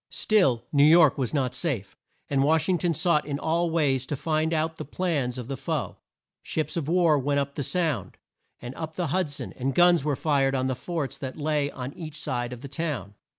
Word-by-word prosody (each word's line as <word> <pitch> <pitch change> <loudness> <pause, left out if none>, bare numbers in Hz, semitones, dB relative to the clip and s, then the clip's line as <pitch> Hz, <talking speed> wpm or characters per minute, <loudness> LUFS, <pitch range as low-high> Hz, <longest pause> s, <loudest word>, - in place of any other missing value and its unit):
Still, 140 - +2
New 140 -1 +5
York 155 -2 +6
was 125 -4 -1
not 130 -4 0
safe; 125 - -3 0.3
and 135 -1 +1
Wash 160 +2 +3
ing 180 -2 +2
ton 170 -1 0
sought 160 -3 +2
in 140 -1 -2
all 165 +3 0
ways 140 -6 +1
to 145 - -2
find 155 +2 0
out 160 0 0
the - - -5
plans 145 -6 -1
of 125 -2 -6
the 135 - -3
foe. 145 +3 -3 0.4
Ships 155 -2 -3
of 165 -5 -2
war 165 -3 +3
went 140 +1 +1
up 140 0 -2
the 145 - -4
Sound, 150 - -1 0.4
and 120 +1 -7
up 160 +2 -6
the 175 -4 -2
Hud 185 -4 +1
son, 140 - -6
and 135 +1 -2
guns 175 -3 +5
were 150 -1 0
fired 135 -2 +1
on 130 -1 0
the 130 - 0
forts 155 +1 -4
that 130 -2 -6
lay 150 -1 0
on 130 0 -6
each 155 -3 -8
side 120 -5 -3
of 125 -1 -8
the 140 - -7
town. 135 - -4
145 Hz, 220 wpm, -26 LUFS, 135-165 Hz, 0.4 s, York